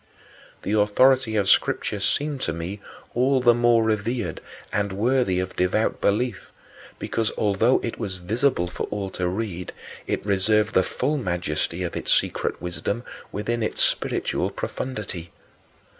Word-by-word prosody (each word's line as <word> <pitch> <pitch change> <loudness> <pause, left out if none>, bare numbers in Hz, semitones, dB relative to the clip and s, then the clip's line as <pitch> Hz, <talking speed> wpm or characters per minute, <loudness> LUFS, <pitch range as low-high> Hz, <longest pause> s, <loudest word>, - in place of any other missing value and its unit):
The 105 - -1
authority 110 +3 +4
of 100 -2 +2
Scripture 100 +1 +2
seemed 145 +7 0
to 85 - -1
me 85 +5 -5 0.3
all 130 +2 +3
the 120 -1 +6
more 120 -1 +4
revered 110 -3 -1 0.3
and 100 0 0
worthy 110 -2 +2
of 95 0 -3
devout 90 +5 +1
belief 120 +5 0 0.5
because, 115 -2 -1
although 110 +4 +3
it 115 - -4
was 100 -5 -2
visible 105 +2 0
for 90 - -4
all 100 -2 -4
to 90 -1 -2
read, 90 -2 -3 0.3
it - - -2
reserved 105 +2 +2
the - - +5
full 140 +10 -1
majesty 90 - -2
of 85 - -4
its - - -2
secret - - +1
wisdom 90 +6 -3 0.3
within 115 +3 -2
its 110 - +1
spiritual - - 0
profundity. 100 -9 -5
105 Hz, 145 wpm, -24 LUFS, 95-120 Hz, 0.5 s, the